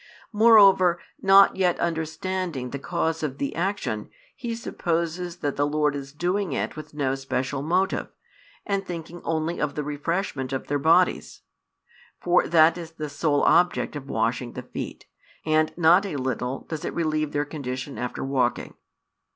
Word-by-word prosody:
Moreover, 200 -5 +6 0.2
not 195 0 +6
yet 180 -2 +2
understanding 165 -4 -3
the 140 - -4
cause 165 0 -2
of 140 -4 -3
the 140 - -3
action, 175 - -2 0.3
he 235 -2 -4
supposes 170 -4 -3
that 145 -2 -2
the 145 0 +2
Lord 150 -1 +1
is 135 -1 -6
doing 175 +3 -1
it - - -2
with 155 -1 -10
no 135 -3 0
special 135 0 -2
motive, 180 +6 0 0.6
and 200 -1 -1
thinking 170 -1 -7
only 160 +1 -2
of 150 -1 -1
the 150 - -2
refreshment 145 -2 -3
of 135 - -3
their 145 0 -1
bodies; 165 +5 +2 0.8
for 175 0 +2
that 165 +1 +5
is 165 -1 -9
the 155 -2 -5
sole 145 0 +1
object 175 -3 +3
of 140 -2 -7
washing 115 +1 -1
the - - -6
feet, - - -7 0.4
and 155 0 +2
not 175 +3 +5
a 180 - -5
little 130 -1 -2
does 160 -2 -6
it - - -4
relieve 155 -2 0
their 145 0 -1
condition 135 -2 -6
after 125 0 -4
walking. 130 -3 -1
155 Hz, 160 wpm, -25 LUFS, 140-175 Hz, 0.8 s, Moreover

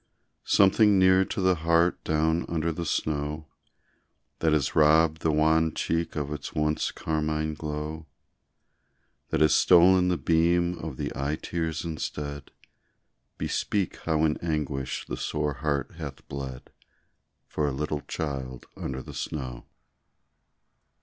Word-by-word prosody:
Something 100 +1 +5
near 95 0 +5
to 95 - -3
the 95 0 +4
heart 85 +2 +2
down 80 +2 +1
under 85 0 0
the 85 +1 -4
snow, 75 0 -2 0.9
That 80 - +2
has 75 -3 +1
robbed 80 +1 +4
the 80 - +2
wan 80 +1 +2
cheek 85 0 -1
of 75 -1 -2
its 75 - -7
once 75 0 0
carmine 80 0 -2
glow, 75 +1 -5 1.2
That - - 0
has 75 - +5
stolen 90 +1 +6
the 90 -1 +1
beam 85 +2 +2
of 80 -5 -6
the - - -3
eye 70 +2 -1
tears 80 -1 -3
instead 75 -3 -5 0.9
Bespeak 100 -4 -1
how 80 -1 +1
in 75 - +1
anguish 75 -5 -3
the - - -5
sore 75 -1 -2
heart 70 +1 -2
hath 75 -5 -8
bled 65 -2 -7 0.7
For 75 - -2
a - - 0
little 75 +2 -3
child 65 -5 -4
under 65 -1 -5
the - - -10
snow. 65 -5 -5
80 Hz, 130 wpm, -27 LUFS, 75-85 Hz, 1.2 s, stolen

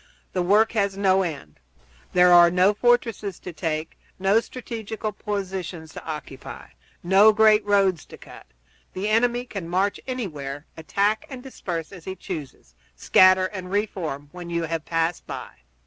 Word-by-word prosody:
The 185 - 0
work 210 +5 +4
has 200 -3 0
no 195 -1 +3
end. 145 - -6 0.5
There 180 0 +6
are 175 0 +8
no 180 +3 +3
fortresses 230 -4 +1
to 180 - -8
take, 160 -1 -4 0.2
no 195 +3 +3
strategical 225 -3 -6
positions 190 -6 -5
to - - -9
occupy, 150 -4 -8 0.3
no 195 +5 +6
great 215 0 +5
roads 195 -5 +2
to - - -12
cut. - - -14 0.5
The 195 +3 -2
enemy 240 +2 +2
can 195 -8 -7
march 190 +3 0
anywhere, 150 - -5
attack 200 +6 0
and 255 -2 -8
disperse 175 -11 -5
as 180 -4 -12
he 190 - -5
chooses, 160 - -8 0.2
scatter, 185 - +5
and 185 -1 -6
re 205 +2 +1
form 150 -8 -6
when 180 -1 -9
you 170 0 -1
have 165 -1 -3
passed 165 +1 -1
by. - - -7
190 Hz, 155 wpm, -24 LUFS, 165-210 Hz, 0.5 s, are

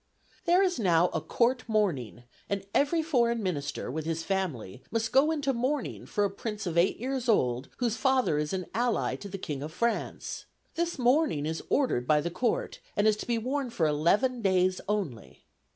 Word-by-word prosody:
"There 355 +2 +5
is 360 -6 0
now 175 -4 +4
a - - -2
Court 245 +10 +1
mourning, 155 - 0 0.3
and 200 -1 -2
every 320 +3 +2
foreign 235 -7 +1
minister, 145 -8 -3
with 155 +2 -4
his 165 0 -2
family, 160 - -3
must 225 -1 -1
go 275 +4 +5
into 285 -4 0
mourning 260 +3 -2
for 205 - 0
a 200 - +2
Prince 210 +1 -5
of 170 -2 -3
eight 170 +2 +3
years 255 0 -3
old, 125 - +2
whose 235 -3 0
father 260 - +2
is 150 0 -2
an 185 -1 -2
ally 240 0 0
to 200 - -8
the 195 - -5
King 150 -7 -5
of 150 +2 -5
France. 235 +8 -2 0.3
This 340 0 -1
mourning 250 - +2
is 160 +1 -2
ordered 250 - +1
by 150 -1 +5
the 170 +3 -2
Court, 255 - -1 0.2
and 205 +1 +4
is 215 - +4
to - - -6
be 235 -1 +1
worn 260 +3 -2
for 205 -9 0
eleven 200 - +2
days 185 -2 +2
only. 150 - -3
210 Hz, 190 wpm, -29 LUFS, 160-255 Hz, 0.3 s, There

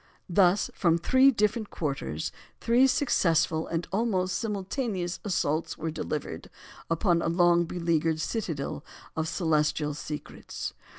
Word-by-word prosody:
Thus 185 +2 +3
from 170 -3 +2
three 260 +10 +5
different 215 -2 0
quarters, 140 - -3 0.3
three 245 +3 +4
successful 165 - +2
and 170 0 -2
almost 190 -4 0
simultaneous 200 -3 -3
assaults 165 -5 -1
were 160 0 -3
delivered 150 - -5 0.4
upon 170 0 +2
a - - -1
long 175 0 +4
beleaguered 165 -2 0
citadel 160 -7 -3 0.3
of 160 0 -1
celestial 150 -3 +1
secrets. 150 +1 -6
170 Hz, 115 wpm, -28 LUFS, 160-205 Hz, 0.4 s, three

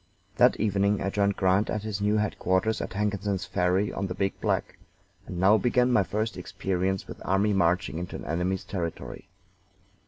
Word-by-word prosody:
That - - +5
evening 100 -1 +1
I 100 - -2
joined 100 -1 +1
Grant 95 +2 +2
at 105 - -2
his 105 -2 -4
new 105 +1 +2
headquarters 105 0 0
at - - -5
Hankinson's 100 -1 -1
Ferry 90 +2 0
on 95 - -2
the 90 - -5
Big 95 -1 -2
Black, - - -1 0.5
and 90 - -5
now 100 +4 +5
began 125 0 +2
my 105 - +4
first 110 +2 -2
experience 95 +1 -2
with - - -9
army 100 +2 +2
marching 90 -2 +1
into 90 +1 -6
an - - -7
enemy's 90 +3 -1
territory. 85 -4 -5
100 Hz, 175 wpm, -27 LUFS, 95-105 Hz, 0.5 s, That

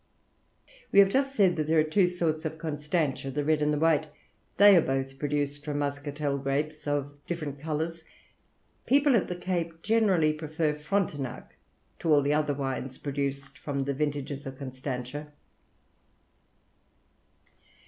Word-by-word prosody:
We - - +1
have 200 -1 +8
just 270 +4 +1
said 185 -6 +4
that 155 -1 -1
there 160 +1 +3
are - - +5
two 180 +4 +3
sorts 165 -3 -1
of 160 0 -4
Constantia, 150 -2 -2
the 145 +2 -2
red 155 0 +2
and 150 0 +2
the 150 - +1
white; 160 0 +3 0.5
they 205 0 +9
are 170 - +7
both 135 -1 -2
produced 145 0 -1
from 145 -1 -3
muscatel 145 0 -2
grapes 150 +3 -2
of 145 0 -2
different 155 -5 -4
colours. 160 +2 -3 0.8
People 280 0 +4
at 210 - +2
the 180 - -3
Cape 170 -2 -3
generally 195 -8 +3
prefer 155 0 -1
Frontignac 150 -5 -3 0.4
to 165 - 0
all 145 -2 +5
the 145 +1 +2
other 150 -1 +1
wines 135 -1 -3
produced 140 -1 -4
from 140 -2 -2
the 140 +1 -1
vintages 145 -1 -3
of 135 0 -7
Constantia." 130 +2 -5
150 Hz, 150 wpm, -28 LUFS, 140-165 Hz, 0.8 s, they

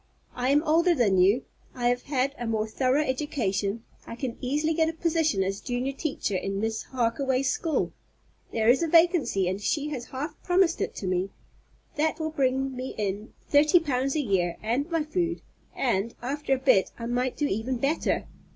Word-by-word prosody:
I 250 +1 -1
am 290 +2 +4
older 335 +2 +3
than 205 -8 +3
you, 200 +8 +4 0.3
I 240 -1 +1
have 245 0 0
had 275 -1 0
a 240 - -3
more 220 -1 0
thorough 260 +6 +1
education, 230 -7 -1 0.2
I - - -6
can 245 -1 -4
easily 295 +5 0
get 320 0 +2
a - - -4
position 320 - +1
as 195 +1 -2
junior 250 +1 -2
teacher 275 -8 -3
in 195 +1 -2
Miss 220 +1 -2
Harkaway's 260 +2 0
school. 325 -3 -1 0.6
There 220 -1 0
is 250 +5 +5
a 335 - +1
vacancy, 330 - +3
and 190 +2 -2
she 295 +7 0
has 255 -5 -5
half 280 +5 -6
promised 360 -1 +2
it - - -2
to - - -6
me. 185 +1 0 0.7
That 315 +1 +1
will 315 0 -2
bring 270 -2 0
me 255 +1 -5
in 205 +1 -3
thirty 300 +4 +5
pounds 275 -3 -1
a 305 - +2
year 185 -8 0
and 250 +8 0
my 330 -2 0
food, 340 +2 -2 0.3
and, 230 -3 0
after 270 +2 -1
a - - -3
bit, 260 -7 +3
I 230 - -5
might 245 +2 -1
do 295 - +1
even 245 +2 -1
better. 275 +6 0
260 Hz, 190 wpm, -27 LUFS, 225-300 Hz, 0.7 s, is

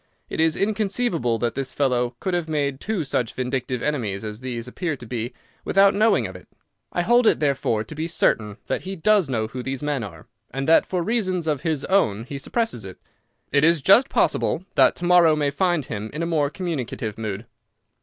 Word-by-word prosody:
It - - -4
is 160 -1 +3
inconceivable 200 - 0
that 120 0 -1
this 135 -1 -4
fellow 125 -3 0
could 185 - -2
have 175 -2 -1
made 140 -3 -1
two 210 -2 -2
such 125 -4 -2
vindictive 125 -1 -2
enemies 110 -9 -2
as 105 0 -6
these 125 -2 -5
appear 160 +4 -3
to 125 - -11
be 120 +1 -4 0.3
without 195 0 +4
knowing 200 - +3
of 95 - -7
it. 90 - -12 0.4
I 175 - 0
hold 240 +3 +4
it, - - +4
therefore, 135 -7 0
to 110 - -10
be 155 +2 -3
certain 110 -10 0
that - - -2
he 190 +2 -5
does 190 -2 +3
know 110 -4 0
who 125 +3 -6
these 135 +2 -4
men 145 -4 -1
are, 85 -6 -9 0.2
and 135 +2 -4
that 165 - +5
for 180 -2 -1
reasons 185 -5 0
of 150 -4 -1
his 155 -4 -1
own 115 - +2
he 140 +3 -7
suppresses 225 - -2
it. 95 -1 -9 0.5
It 140 - +3
is 165 0 +5
just 200 - +5
possible 175 - +1
that - - +5
to 175 - -5
morrow 175 -3 +6
may 145 -2 0
find 175 -2 +1
him 105 0 -5
in 160 - -2
a - - 0
more 155 -4 +1
communicative 135 - -4
mood." 110 0 -4
145 Hz, 205 wpm, -23 LUFS, 120-175 Hz, 0.5 s, morrow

